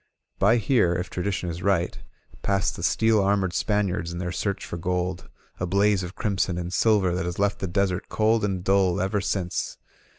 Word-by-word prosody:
By 110 +5 +5
here, 110 -6 +2
if 90 +1 -4
tradi 95 +3 -2
tion 90 -2 -3
is 85 +2 -7
right, 95 -3 0 0.4
passed 100 -2 0
the - - -8
steel 110 +4 +3
armored 95 -2 +1
Spaniards 100 -4 0
in 85 - -5
their 90 0 -3
search 100 +2 -2
for - - -5
gold, 90 0 -2 0.3
a 90 - -1
blaze 100 +1 +3
of 90 +1 -7
crimson 95 -4 -1
and 90 0 -4
silver 100 -5 +3
that 90 0 -2
has 85 -1 -4
left 100 0 +1
the 95 - -2
desert 90 0 -1
cold 110 0 +2
and 95 -3 -1
dull 95 -1 +2
ever 95 +2 0
since. 95 -3 -2
95 Hz, 195 wpm, -25 LUFS, 90-100 Hz, 0.4 s, By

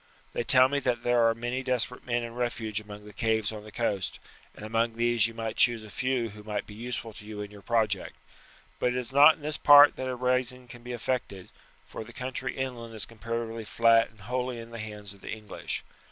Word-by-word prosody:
They - - -1
tell 130 +1 +6
me 140 +1 0
that 125 -3 -1
there 120 -1 +4
are 115 - 0
many 120 +3 -3
desperate 125 -1 -1
men 120 -1 0
in 115 0 -6
refuge 115 -3 -2
among 105 -1 -11
the 105 - -12
caves 110 0 0
on 105 -1 -8
the 105 - -11
coast, 100 -5 -1 0.4
and 105 - -9
among 115 +1 0
these 115 -1 +2
you 115 - -10
might 115 -1 -4
choose 120 -2 +4
a 105 - -11
few 130 -2 -1
who 105 +1 -11
might 105 -1 -3
be 105 - -11
useful 115 0 -5
to 105 - -11
you 105 0 -8
in 105 0 -7
your 105 -1 -12
project; 110 -3 0 0.6
but 125 - +1
it - - -2
is 125 0 -4
not 145 +3 +8
in - - -20
this 150 0 -2
part 145 0 +8
that 130 - -3
a 130 - -2
rising 125 0 0
can 120 0 -12
be 125 +1 -7
effected, 120 -5 -3 0.4
for - - -7
the 120 +2 -13
country 130 +1 -4
inland 120 -4 -4
is 110 - 0
comparatively 115 0 -5
flat 115 +1 +4
and 105 -1 -21
wholly 125 +3 -2
in 115 0 -9
the 115 - -7
hands 105 -2 -7
of 100 - -19
the - - -9
English. 110 -1 -5
115 Hz, 230 wpm, -28 LUFS, 110-125 Hz, 0.6 s, not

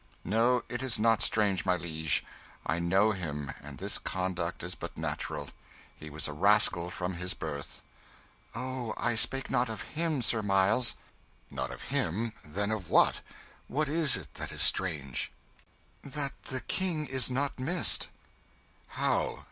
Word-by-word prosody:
"No, 115 +5 +3
it 120 +1 -3
is 130 -3 +1
not 115 0 +4
strange, 100 -4 +3
my 90 - +3
liege. 80 -3 0 0.4
I 80 - +1
know 95 +5 +4
him, 75 -7 -3
and 70 -1 -9
this - - 0
conduct 90 -2 -2
is 90 +1 -3
but - - -7
natural. 70 - -3 0.5
He 75 - -9
was 75 +1 -2
a 75 - -4
rascal 90 0 +4
from 90 +1 -3
his 90 +3 -3
birth." 70 -3 -6 0.7
"Oh, 125 -1 -3
I 120 +1 +1
spake 135 +4 0
not 125 -2 +2
of 110 - -4
him, 155 -4 0
Sir 115 -1 +4
Miles." 100 +4 +3 0.6
"Not - - -2
of - - -8
him? 110 +7 0
Then 100 +7 -2
of 105 -6 -2
what? - - +5 0.5
What 150 +3 0
is 155 -2 +4
it - - -10
that - - -5
is - - +2
strange?" 75 -9 0 0.7
"That 140 -1 -4
the 130 -3 -3
King 165 +2 0
is 130 -1 0
not 135 +2 -1
missed." 170 +7 +1 0.9
"How? - - +1
105 Hz, 155 wpm, -31 LUFS, 85-130 Hz, 0.9 s, what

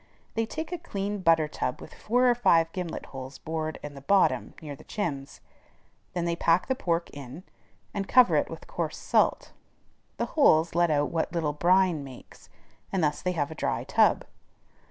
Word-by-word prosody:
They 225 0 -1
take 315 +7 -5
a 355 - -3
clean 205 -10 -4
butter 165 -4 +3
tub 140 -4 -3
with - - -11
four 245 +3 +1
or 245 - +6
five 165 -9 +3
gimlet 180 -2 -5
holes 130 0 -7
bored 155 -1 -4
in 145 -1 -7
the 140 - -11
bottom 195 +7 +2
near 150 -3 -7
the - - -15
chimbs. 145 -9 -4 0.7
Then 175 -1 -1
they 170 0 0
pack 170 +1 +2
the 260 - 0
pork 170 -8 -1
in, 140 +4 -9 0.5
and 200 -1 -3
cover 250 -1 +5
it - - +1
with - - -9
coarse - - -4
salt; - - +1 0.7
the - - 0
holes 170 - +4
let 175 0 +3
out 145 -1 +1
what 165 -1 -1
little 160 -4 -1
brine 175 0 +3
makes, 130 -2 -13 0.4
and 190 -3 0
thus 150 0 0
they 180 - -1
have 145 -3 -2
a - - -4
dry 155 - -2
tub. - - +3
170 Hz, 185 wpm, -27 LUFS, 150-195 Hz, 0.7 s, or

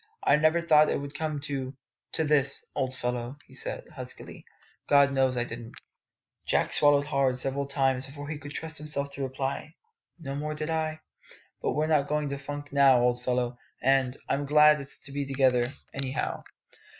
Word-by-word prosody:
"I - - +5
never 155 +3 +3
thought 155 -2 +5
it - - 0
would 140 0 -7
come 155 -2 -2
to 135 -2 -4 0.4
to 160 - +1
this, 145 -3 +4
old 130 -1 -1
fellow," 125 +2 -3
he - - -19
said - - -4
huskily; - - -7 0.4
"God 140 -1 +6
knows 130 -2 +2
I 120 - +2
didn't!" 115 -1 -8 0.7
Jack - - +1
swallowed 145 -1 +4
hard 135 -3 +1
several 135 +2 -2
times 135 -1 +1
before 145 +1 -8
he 150 0 -5
could 145 0 -9
trust 160 0 -5
himself 145 -2 -3
to 140 - -6
reply. 135 +4 -4 0.4
"No 140 -5 -6
more 150 +1 -3
did 155 +1 -3
I. 155 -1 -2 0.6
But - - 0
were 150 +1 +1
not 150 -3 +2
going 150 -1 -1
to 140 0 -4
funk 145 +1 -7
now, 135 -3 +6
old 125 0 +1
fellow; 125 -1 -1 0.2
and 135 -1 +2
and - - -15 0.2
I'm 145 - -3
glad 150 0 +6
it's 140 - -6
to 140 - -7
be 140 +1 -2
together, 130 -2 +2 0.2
anyhow!" 135 -1 -2
140 Hz, 185 wpm, -28 LUFS, 130-150 Hz, 0.7 s, God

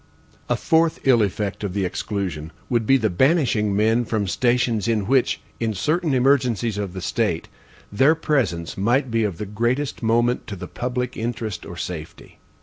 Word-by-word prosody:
A - - +3
fourth 165 -1 +2
ill 125 -4 +5
effect 100 0 -2
of 100 -2 -3
the 100 -2 0
exclusion 90 -5 -3 0.2
would 115 -3 +1
be 135 - +6
the 110 -4 +1
banishing 115 - +2
men 110 +3 +3
from 110 -3 -1
stations 120 +1 +1
in 110 -4 +1
which, 130 +3 +2 0.2
in 110 -2 -1
certain 155 - 0
emergencies 125 -5 +2
of 100 -3 -4
the 95 - -6
state, - - -1 0.4
their 135 +10 +4
presence 120 - -1
might 120 +6 +1
be 115 0 +2
of 100 -6 -2
the 105 - -4
greatest 120 +7 -1
moment 120 +2 +1
to 105 - -5
the 90 - -7
public 125 0 -3
interest 110 -5 -4
or 85 - -8
safety. 80 -3 -7
115 Hz, 170 wpm, -22 LUFS, 100-125 Hz, 0.4 s, be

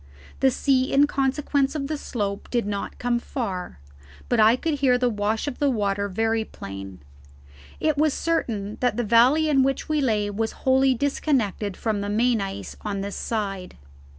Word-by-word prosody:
The 270 - +5
sea 260 0 +1
in 280 +1 +5
consequence 275 0 0
of 285 -2 -2
the 305 +2 -2
slope 205 -8 -4
did 240 -3 0
not 200 -1 -4
come 245 -1 0
so - - -19
far, 190 - -4 0.5
but - - +2
I 220 +2 +6
could 300 +2 -2
hear 255 -3 +4
the 245 -1 +1
wash 210 +1 -1
of 280 - -4
the 290 -2 +3
water 200 -4 0
very 225 +3 0
plain. 95 - -9 0.8
It 310 -2 +1
was 310 0 +3
certain 220 -11 -2
that 245 -3 +1
the 240 - +1
valley 245 +8 +4
in 280 -3 +4
which 270 +1 0
we 305 -1 +1
lay 210 -5 +1
was 220 +2 -2
wholly 265 0 +4
disconnected 230 -7 -1
from 215 -3 -1
the 205 - -3
main 230 +1 +2
ice 195 0 -5
on 200 -2 -3
this 200 0 -5
side. 195 -5 -4
235 Hz, 180 wpm, -24 LUFS, 205-270 Hz, 0.8 s, I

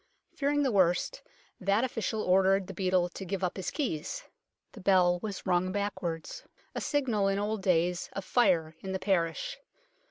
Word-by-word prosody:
Fearing 290 0 +1
the 265 - +2
worst, 180 -4 +2 0.4
that 200 +4 +2
official 225 -3 -2
ordered 190 +1 +4
the 190 - -8
beadle 185 -1 +1
to 185 - -8
give 190 +1 -3
up 180 - 0
his 190 -3 -3
keys. 280 - -3 0.5
The 210 - -12
bell 180 -2 +4
was 205 -3 -5
rung 185 0 +2
backwards, 190 - -3 0.3
a - - -3
signal 240 -9 +1
in 195 0 +1
old 210 +1 -1
days 180 -1 +1
of 195 - -5
fire 170 -9 +2
in 190 +1 -5
the - - 0
parish. 190 - -1
190 Hz, 165 wpm, -30 LUFS, 180-215 Hz, 0.5 s, ordered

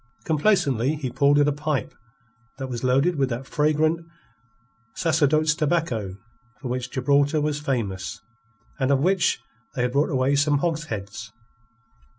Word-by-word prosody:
Complacently 150 - +2
he 135 -5 -4
pulled 140 +3 +3
at 145 0 +4
a - - +3
pipe 150 -1 -2 0.6
that 135 - -4
was 120 -1 -5
loaded 135 +7 +2
with 135 -2 +1
that 125 +2 -4
fragrant 155 +3 +1 0.9
Sacerdotes 155 -1 +2
tobacco 150 - -1 0.4
for 130 - -6
which 125 0 -3
Gibraltar 140 +3 +2
was 150 0 -1
famous, 105 -10 -3 0.6
and 130 -1 +1
of 140 - +4
which 185 0 +2 0.4
they 125 - 0
had 125 - 0
brought 140 +3 +2
away 135 -1 +1
some 145 +1 +3
hogsheads. 120 - -4
140 Hz, 140 wpm, -24 LUFS, 125-155 Hz, 0.9 s, at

